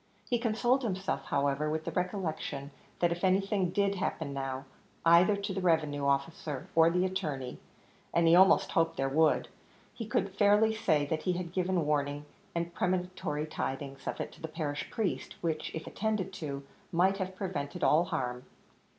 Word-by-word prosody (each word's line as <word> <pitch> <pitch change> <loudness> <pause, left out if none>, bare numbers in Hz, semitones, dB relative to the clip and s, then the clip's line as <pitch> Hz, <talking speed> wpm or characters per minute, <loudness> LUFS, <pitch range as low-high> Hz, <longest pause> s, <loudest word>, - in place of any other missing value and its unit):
He 240 -2 +1
consoled 240 +3 +2
himself, 195 -5 -2
however, 140 +2 0
with 155 +1 -2
the - - -2
recollection 175 -6 -3 0.3
that 175 -1 +2
if 175 +2 -3
anything 195 0 +2
did 200 +2 +1
happen 180 -7 -3
now, 135 0 -4 0.4
either 170 +5 +6
to 200 0 -3
the 190 - -2
revenue 155 -5 +1
officer 140 0 -1
or 165 0 +6
the 180 +2 +2
attorney, 150 -9 -3 0.5
and 170 0 +3
he 165 - +7
almost 190 +2 +6
hoped 165 0 +1
there 135 - +1
would, 155 +3 +3 0.5
he 225 - -6
could 195 -2 0
fairly 205 +2 +4
say 155 -9 +2
that 155 +2 -2
he 180 - 0
had 175 -1 -4
given 185 -3 +1
warning 145 -1 0 0.3
and 170 0 -2
premonitory 180 -5 -1
tidings 135 -2 -5
of - - -3
it - - -4
to - - -16
the 160 - -3
parish 150 -2 -4
priests, 215 -4 -2
which, 160 -2 -1
if 160 - -5
attended 210 -3 -2
to, 145 -7 -5 0.3
might 185 +3 +3
have 190 0 -3
prevented 180 -3 -4
all 160 +3 +5
harm. 125 -5 -3
170 Hz, 170 wpm, -31 LUFS, 150-190 Hz, 0.5 s, he